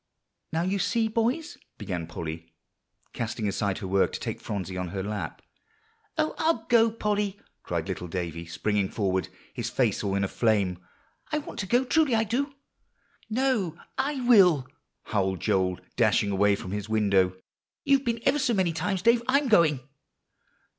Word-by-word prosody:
"Now 165 Hz, +1 st, 0 dB
you 190 Hz, +2 st, 0 dB
see, 220 Hz, +4 st, +1 dB
boys," 235 Hz, +8 st, -1 dB, 0.2 s
began 85 Hz, -5 st, -4 dB
Polly, 80 Hz, 0 st, -7 dB, 0.6 s
casting 115 Hz, -2 st, -3 dB
aside 100 Hz, -1 st, -1 dB
her 95 Hz, -, -5 dB
work 95 Hz, +1 st, +2 dB
to -, -, -3 dB
take -, -, -4 dB
Phronsie 95 Hz, -3 st, -4 dB
on 90 Hz, 0 st, -3 dB
her 95 Hz, +2 st, -4 dB
lap. 105 Hz, +1 st, -5 dB, 0.7 s
"Oh, 310 Hz, 0 st, +1 dB
I'll 315 Hz, -9 st, +1 dB
go, 230 Hz, -1 st, +6 dB
Polly!" 210 Hz, -2 st, -1 dB, 0.2 s
cried -, -, -3 dB
little 90 Hz, -, -4 dB
Davie, 85 Hz, -1 st, -4 dB
springing 100 Hz, +3 st, 0 dB
forward, 95 Hz, -3 st, -1 dB, 0.2 s
his -, -, -3 dB
face -, -, +1 dB
all 100 Hz, -1 st, 0 dB
in 100 Hz, -, +1 dB
a -, -, +1 dB
flame. 100 Hz, -5 st, +1 dB, 0.5 s
"I 305 Hz, -, +1 dB
want 295 Hz, -, -6 dB
to 190 Hz, -, -2 dB
go; 245 Hz, +6 st, +3 dB
truly 295 Hz, -2 st, +3 dB
I 220 Hz, -, +3 dB
do." 275 Hz, +6 st, -2 dB, 0.7 s
"No, 220 Hz, -, 0 dB, 0.2 s
I 275 Hz, 0 st, -1 dB
will," 190 Hz, -, +6 dB, 0.4 s
howled 95 Hz, -3 st, -1 dB
Joel, 90 Hz, -1 st, +1 dB, 0.2 s
dashing 100 Hz, -, +3 dB
away 100 Hz, +1 st, +3 dB
from 95 Hz, -2 st, -7 dB
his 105 Hz, +1 st, -4 dB
window. 100 Hz, -4 st, +3 dB, 0.5 s
"You've 275 Hz, -1 st, +3 dB
been 235 Hz, -2 st, -1 dB
ever 295 Hz, -, +3 dB
so 245 Hz, -4 st, +1 dB
many 185 Hz, -4 st, +1 dB
times, 185 Hz, +2 st, -2 dB
Dave; 235 Hz, +1 st, +5 dB
I'm 275 Hz, +1 st, +3 dB
going." 160 Hz, -, +4 dB
160 Hz, 165 wpm, -27 LUFS, -, 0.7 s, go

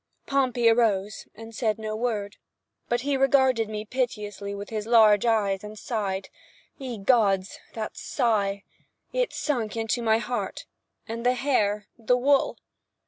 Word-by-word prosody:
Pompey 255 Hz, -4 st, +1 dB
arose, 215 Hz, -3 st, +2 dB
and 225 Hz, +1 st, -11 dB
said 220 Hz, -1 st, 0 dB
no 215 Hz, -1 st, -4 dB
word. 215 Hz, -3 st, -2 dB, 0.5 s
But 240 Hz, 0 st, +1 dB
he 280 Hz, +1 st, 0 dB
regarded 265 Hz, -4 st, +3 dB
me 215 Hz, 0 st, -5 dB
piteously 210 Hz, -5 st, -3 dB
with 200 Hz, +2 st, -8 dB
his 215 Hz, -1 st, -3 dB
large 220 Hz, -2 st, +5 dB
eyes 205 Hz, -3 st, +1 dB
and—sighed. 210 Hz, -2 st, -4 dB, 0.5 s
Ye 255 Hz, -4 st, -5 dB
Gods—that 205 Hz, 0 st, 0 dB
sigh! 205 Hz, -6 st, 0 dB, 0.5 s
It -, -, 0 dB
sunk 235 Hz, -7 st, -2 dB
into 225 Hz, +2 st, -1 dB
my 220 Hz, -1 st, +3 dB
heart. 240 Hz, +1 st, -4 dB, 0.4 s
And 230 Hz, 0 st, -5 dB
the 250 Hz, +1 st, +3 dB
hair—the 225 Hz, -2 st, 0 dB
wool! 275 Hz, +2 st, +2 dB
225 Hz, 130 wpm, -26 LUFS, 210-245 Hz, 0.5 s, large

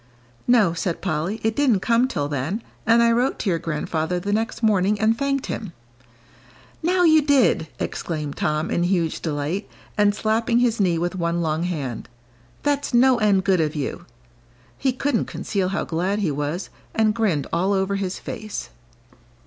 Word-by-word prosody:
"No," 225 Hz, -9 st, +4 dB
said 170 Hz, 0 st, -2 dB
Polly, 180 Hz, +4 st, -2 dB
"it 220 Hz, 0 st, +1 dB
didn't 255 Hz, -9 st, +3 dB
come 235 Hz, +4 st, +3 dB
till 145 Hz, -, -2 dB
then. 145 Hz, -, -3 dB, 0.2 s
And 230 Hz, +1 st, +5 dB
I 235 Hz, -, +4 dB
wrote 245 Hz, +3 st, +1 dB
to 195 Hz, -, -1 dB
your 165 Hz, -, 0 dB
grandfather 160 Hz, +2 st, -2 dB
the 200 Hz, +3 st, -2 dB
next 225 Hz, +2 st, -2 dB
morning 205 Hz, -1 st, +3 dB
and 220 Hz, +1 st, +3 dB
thanked 275 Hz, +1 st, -1 dB
him." 205 Hz, -7 st, -5 dB, 1.1 s
"Now 360 Hz, +2 st, +2 dB
you 315 Hz, -2 st, +6 dB
did!" 265 Hz, -, +3 dB
exclaimed 150 Hz, -4 st, -4 dB
Tom, 155 Hz, +2 st, -1 dB
in -, -, +1 dB
huge 175 Hz, -3 st, 0 dB
delight, 155 Hz, +5 st, -3 dB, 0.3 s
and 205 Hz, 0 st, +4 dB
slapping 225 Hz, +2 st, +1 dB
his 240 Hz, -2 st, +2 dB
knee 180 Hz, -4 st, +2 dB
with 175 Hz, +2 st, -1 dB
one 170 Hz, -1 st, -1 dB
long 160 Hz, +1 st, 0 dB
hand. 140 Hz, -11 st, -4 dB, 0.5 s
"That's 285 Hz, -3 st, 0 dB
no 255 Hz, 0 st, +5 dB
end 200 Hz, -3 st, +3 dB
good 185 Hz, -3 st, +3 dB
of 155 Hz, 0 st, -1 dB
you." 145 Hz, -3 st, -4 dB, 0.7 s
He 265 Hz, -, 0 dB
couldn't 255 Hz, -1 st, 0 dB
conceal 195 Hz, -3 st, -2 dB
how 195 Hz, -, -2 dB
glad 180 Hz, +5 st, -1 dB
he 195 Hz, -7 st, 0 dB
was, 145 Hz, +6 st, -3 dB, 0.2 s
and 220 Hz, -1 st, +3 dB
grinned 195 Hz, -11 st, 0 dB
all 180 Hz, +4 st, +1 dB
over 195 Hz, 0 st, +1 dB
his 190 Hz, -1 st, -3 dB
face. 215 Hz, -1 st, -6 dB
195 Hz, 170 wpm, -23 LUFS, 165-230 Hz, 1.1 s, you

